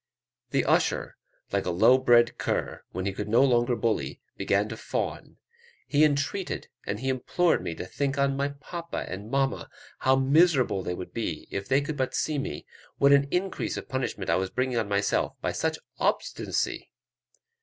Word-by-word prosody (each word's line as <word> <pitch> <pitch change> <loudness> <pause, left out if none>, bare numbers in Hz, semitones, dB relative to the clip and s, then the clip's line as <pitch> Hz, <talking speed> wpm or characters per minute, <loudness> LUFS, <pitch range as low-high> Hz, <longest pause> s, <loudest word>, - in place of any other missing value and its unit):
The - - +1
usher, - - +1 0.4
like - - 0
a - - +1
low 110 +9 +5
bred 120 -2 +4
cur, - - -2
when 95 - -4
he 100 - -1
could 105 +2 -5
no 115 +5 +5
longer 120 -2 +3
bully, 115 -2 -1 0.2
began - - +1
to - - -5
fawn; - - -4 0.5
he 145 +1 +3
entreated 150 +6 0 0.2
and 105 +3 -3
he 130 - -3
implored 135 +7 +1
me 85 - -4
to - - -6
think 140 +7 -2
on 140 0 +2
"my 140 +1 0
papa 170 +4 -6
and 100 +4 -6
mamma; 135 +1 0 0.3
how 130 0 +4
miserable 135 - +3
they 90 -1 -3
would 90 - -8
be, 90 -9 -3
if 100 0 -4
they 135 +2 +3
could 145 +1 -4
but 130 -1 -1
see 155 -2 0
me; 75 - -5 0.3
what 140 0 +5
an 140 0 +4
increase 185 +5 -1
of - - -7
punishment 130 -7 -2
I - - +3
was 95 0 -1
bringing 130 -2 0
on 110 -2 -2
myself 100 0 +1
by - - -1
such 160 0 -1 0.2
obstinacy." - - -1
130 Hz, 180 wpm, -27 LUFS, 105-140 Hz, 0.5 s, low